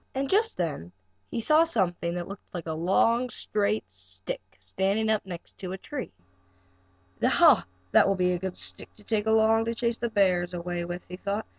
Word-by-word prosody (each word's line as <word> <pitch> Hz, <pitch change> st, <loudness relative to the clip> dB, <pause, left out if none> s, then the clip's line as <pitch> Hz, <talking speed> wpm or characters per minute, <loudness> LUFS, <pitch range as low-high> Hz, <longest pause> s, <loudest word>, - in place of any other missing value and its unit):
And 270 Hz, +1 st, 0 dB
just 440 Hz, +3 st, +2 dB
then 145 Hz, -, -3 dB, 0.4 s
he -, -, -3 dB
saw 310 Hz, +7 st, +5 dB
something 175 Hz, -, 0 dB, 0.3 s
like 175 Hz, -3 st, -5 dB
a 160 Hz, -, -3 dB
long, 225 Hz, +9 st, +2 dB
straight 210 Hz, -1 st, -1 dB
stick, 95 Hz, 0 st, -6 dB, 0.2 s
standing 195 Hz, -, 0 dB
up 215 Hz, -, +1 dB
against 180 Hz, +1 st, -9 dB
a 185 Hz, +1 st, -4 dB
tree. 260 Hz, +6 st, -6 dB, 1.1 s
"Ha, -, -, +6 dB, 0.3 s
that -, -, +6 dB
will 195 Hz, -, +2 dB
be 180 Hz, -1 st, +2 dB
a 180 Hz, -, -1 dB
good 190 Hz, 0 st, -4 dB
stick -, -, -7 dB
to 210 Hz, -, -16 dB
take 215 Hz, 0 st, 0 dB
along 220 Hz, 0 st, +4 dB
to 230 Hz, 0 st, -2 dB
chase 235 Hz, 0 st, -1 dB
the 235 Hz, -, -1 dB
bears 180 Hz, -4 st, +2 dB
away 175 Hz, 0 st, -3 dB
with," 175 Hz, +1 st, -5 dB
he 180 Hz, -, -7 dB
thought. 200 Hz, +3 st, -3 dB
195 Hz, 175 wpm, -27 LUFS, 175-225 Hz, 1.1 s, Ha